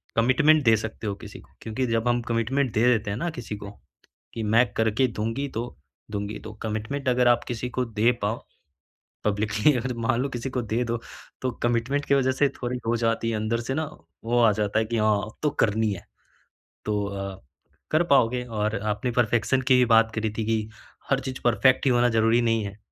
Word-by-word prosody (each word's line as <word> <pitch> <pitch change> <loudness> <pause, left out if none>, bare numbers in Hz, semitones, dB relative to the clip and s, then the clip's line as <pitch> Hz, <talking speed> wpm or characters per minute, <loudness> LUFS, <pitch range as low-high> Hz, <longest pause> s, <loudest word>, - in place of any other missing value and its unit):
Commitment 140 +6 +4
दे 115 -1 +6
सकते 110 0 -5
हो 100 - -1
किसी - - -10
को - - -22
क्योंकि 115 +4 -2
जब 115 +1 0
हम 120 0 +2
कमिटमेंट 120 +3 0
दे 110 - +2
देते 110 -4 +2
हैं 105 - -3
ना 170 - -2
किसी 115 -8 -6
को, 100 -1 -8 0.6
कि 115 - -4
मैं 115 +3 +4
करके 110 +4 +2
दूँगी 115 +5 -3
तो 120 +2 -5 0.3
दूँगी 100 +1 -3
तो। 110 - -9
कमिटमेंट 110 +6 -2
अगर 125 0 +3
आप 120 - +3
किसी 125 +1 -3
को 125 0 -1
दे 115 +2 +2
पाओ 110 +3 -2 0.8
पब्लिकली 105 +6 +2
अगर 125 +1 -2
मान 120 -2 +2
लो 140 - -1
किसी 125 +1 -4
को 125 -1 -2
दे 115 +2 -1
दो 115 0 -2 0.4
तो 130 - -1
कमिटमेंट 120 +5 0
की 140 - +3
वजह 130 -1 +2
से 140 +2 +2
थोड़ी 125 +1 -2
हो 120 - +2
जाती 115 0 0
है - - -1
अंदर 110 +2 -1
से 130 +3 -3
ना 160 +1 -1 0.4
वो 120 +1 +2
आ 115 -2 +6
जाता 105 +1 0
है 110 - 0
कि 115 +1 -2
हाँ, 105 -1 +3
अब 105 - -13
तो 150 - +3
करनी 110 -5 +1
है। 90 - -8 0.8
तो 105 -1 0
अ, 100 -1 -5 0.5
कर 155 +2 +3
पाओगे 125 -1 +3
और 110 -2 -2
आपने 105 +4 -1
परफेक्शन 120 +3 +2
की 130 - +6
भी 125 - +5
बात 115 0 +4
करी 110 -1 -1
थी 110 - 0
कि 110 -1 0 0.4
हर 135 0 +3
चीज़ 130 -1 -6
परफेक्ट 130 +3 +3
ही - - +5
होना 120 0 +4
ज़रूरी 115 +1 +3
नहीं 115 -2 +1
है। 100 +1 -7
115 Hz, 210 wpm, -25 LUFS, 110-125 Hz, 0.8 s, दे